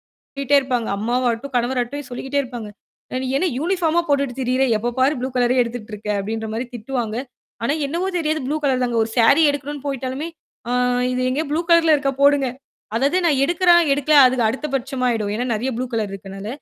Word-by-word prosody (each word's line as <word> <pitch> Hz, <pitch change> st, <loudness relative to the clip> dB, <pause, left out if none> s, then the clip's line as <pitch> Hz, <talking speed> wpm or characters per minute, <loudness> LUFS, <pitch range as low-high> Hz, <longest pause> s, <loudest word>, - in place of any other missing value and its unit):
சொல்லிக்கிட்டே 280 Hz, 0 st, -2 dB
இருப்பாங்க. 250 Hz, -4 st, -2 dB
அம்மாவாட்டும், 240 Hz, +4 st, -1 dB
கணவாட்டும் 250 Hz, +3 st, -1 dB
சொல்லிக்கிட்டே 270 Hz, +3 st, -2 dB
இருப்பாங்க. 240 Hz, -4 st, -7 dB, 0.4 s
அ -, -, -2 dB
"நீ 255 Hz, -, -3 dB
என்ன 365 Hz, -, +1 dB
யுனிஃபாம 345 Hz, 0 st, +1 dB
போட்டுட்டு 280 Hz, -3 st, 0 dB
திரியிற? 255 Hz, +1 st, +2 dB
எப்ப 240 Hz, +2 st, -2 dB
பாரு 275 Hz, +4 st, +3 dB
புளு 260 Hz, +2 st, -2 dB
கலரே 250 Hz, +1 st, +2 dB
எடுத்துட்டு 235 Hz, -2 st, -7 dB
இருக்க" 210 Hz, 0 st, -6 dB
அப்பிடின்றமாரி 220 Hz, +3 st, -3 dB
திட்டுவாங்க. 235 Hz, -1 st, -3 dB, 0.5 s
ஆனா, 260 Hz, +5 st, +1 dB
என்னவோ 340 Hz, +7 st, -2 dB
தெரியாது, 310 Hz, -1 st, 0 dB
புளு 290 Hz, -, -1 dB
கலர் 260 Hz, -3 st, +1 dB
தாங்க. 240 Hz, -1 st, -1 dB
ஒரு 220 Hz, -, -5 dB
ஸேரி 240 Hz, +7 st, +5 dB
எடுக்கணுனு 285 Hz, 0 st, -6 dB
போயிட்டாலுமே 270 Hz, +2 st, -3 dB, 0.4 s
அ -, -, -1 dB, 0.4 s
இது 255 Hz, -, -1 dB
எங்கயோ 300 Hz, +5 st, -1 dB
புளு 315 Hz, -, +1 dB
கலர்ல 330 Hz, -2 st, +5 dB
இருக்க 275 Hz, -1 st, 0 dB
போடுங்க. 280 Hz, -1 st, +4 dB, 0.5 s
அதாவது 280 Hz, +9 st, +2 dB
நான் 295 Hz, -5 st, +3 dB
எடுக்கிறேன், 345 Hz, +2 st, +4 dB
எடுக்கல 290 Hz, +2 st, +2 dB
அதுக்கு 250 Hz, -2 st, 0 dB
அடுத்த 265 Hz, +6 st, -4 dB
பட்சம் 265 Hz, 0 st, -3 dB
ஆயிடும். 215 Hz, -4 st, -1 dB
ஏன்னா 245 Hz, +3 st, -2 dB
நிறைய 230 Hz, +5 st, -1 dB
புளு 255 Hz, -, -1 dB
கலர் 215 Hz, -3 st, -1 dB
இருக்கனால. 195 Hz, +1 st, -8 dB
260 Hz, 180 wpm, -21 LUFS, 235-285 Hz, 0.5 s, ஸேரி